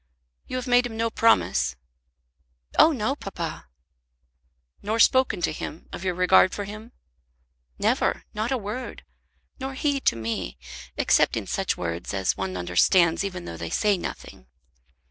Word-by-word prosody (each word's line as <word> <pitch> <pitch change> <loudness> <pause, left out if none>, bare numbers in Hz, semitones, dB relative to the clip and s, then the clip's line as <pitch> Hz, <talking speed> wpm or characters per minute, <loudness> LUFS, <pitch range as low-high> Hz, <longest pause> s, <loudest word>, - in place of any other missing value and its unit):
You - - -5
have 255 0 -3
made 245 -1 +4
him 225 -2 -8
no 230 0 0
promise?" 225 - +2 1.0
"Oh 325 - +8
no, 260 -1 -1
papa." 170 - -6 1.1
"Nor 215 +2 -1
spoken 260 -7 +4
to - - +2
him 155 - -7
of - - -6
your 185 -2 -1
regard 180 0 +5
for 205 - -3
him?" 215 +4 -9 0.9
"Never; - - +1
not 215 +3 -2
a 265 - +2
word. 220 +4 -6 0.6
Nor 265 0 -5
he 285 0 0
to 265 - +2
me, 110 - -4 0.4
except - - +3
in - - -3
such - - -1
words 85 +3 -4
as 95 -1 0
one 95 -1 -3
understands 160 - +3
even 185 -3 -5
though 85 - -7
they 85 0 -5
say 210 - +2
nothing." 115 - -8
200 Hz, 150 wpm, -25 LUFS, -, 1.1 s, Oh